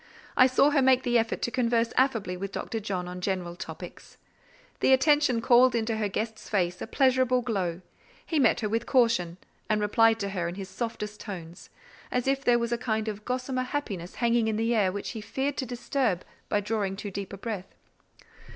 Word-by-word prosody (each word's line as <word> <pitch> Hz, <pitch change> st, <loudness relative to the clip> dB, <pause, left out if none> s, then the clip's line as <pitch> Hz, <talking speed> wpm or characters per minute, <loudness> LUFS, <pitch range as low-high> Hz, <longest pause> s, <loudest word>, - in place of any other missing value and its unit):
I 255 Hz, -, +7 dB
saw 275 Hz, +3 st, +4 dB
her 290 Hz, -2 st, +3 dB
make 260 Hz, 0 st, +4 dB
the 240 Hz, -2 st, +3 dB
effort 225 Hz, 0 st, -2 dB
to 240 Hz, -, 0 dB
converse 235 Hz, -1 st, +1 dB
affably 225 Hz, -9 st, +1 dB
with 195 Hz, +2 st, -5 dB
Dr. 225 Hz, +2 st, -4 dB
John 190 Hz, -4 st, -3 dB
on 180 Hz, 0 st, -7 dB
general 180 Hz, -2 st, -2 dB
topics. -, -, -9 dB, 0.6 s
The 265 Hz, -, +4 dB
attention 275 Hz, -3 st, +3 dB
called 245 Hz, +1 st, +5 dB
into 225 Hz, -1 st, 0 dB
her 215 Hz, -1 st, 0 dB
guest's 220 Hz, +2 st, -4 dB
face 180 Hz, -4 st, 0 dB
a -, -, -4 dB
pleasurable 255 Hz, -2 st, +2 dB
glow; 190 Hz, -7 st, -2 dB, 0.4 s
he 320 Hz, -, 0 dB
met 265 Hz, -, +3 dB
her 215 Hz, -, 0 dB
with 225 Hz, +2 st, -1 dB
caution, 230 Hz, -9 st, +2 dB, 0.3 s
and 215 Hz, -1 st, +2 dB
replied 225 Hz, +2 st, +3 dB
to 200 Hz, -, -2 dB
her 180 Hz, -3 st, -2 dB
in 175 Hz, -, -5 dB
his 195 Hz, -1 st, -7 dB
softest 210 Hz, 0 st, -5 dB
tones, 175 Hz, -5 st, -8 dB, 0.4 s
as 250 Hz, -1 st, -1 dB
if 275 Hz, 0 st, +1 dB
there 245 Hz, -2 st, +4 dB
was 235 Hz, 0 st, -2 dB
a 235 Hz, -, 0 dB
kind 220 Hz, -3 st, -1 dB
of 210 Hz, 0 st, -7 dB
gossamer 255 Hz, +1 st, -2 dB
happiness 230 Hz, -, -4 dB
hanging 235 Hz, -1 st, +2 dB
in 220 Hz, -, 0 dB
the 225 Hz, +2 st, +1 dB
air 205 Hz, -5 st, +2 dB
which 200 Hz, +1 st, -5 dB
he 220 Hz, -, -6 dB
feared 270 Hz, +6 st, -2 dB
to 260 Hz, -, -2 dB
disturb 245 Hz, -5 st, -1 dB, 0.2 s
by 205 Hz, -, +1 dB
drawing 205 Hz, -2 st, -1 dB
too 205 Hz, +1 st, -6 dB
deep 195 Hz, 0 st, -5 dB
a 195 Hz, -, -7 dB
breath. 200 Hz, -3 st, -6 dB
225 Hz, 200 wpm, -27 LUFS, 195-250 Hz, 0.6 s, I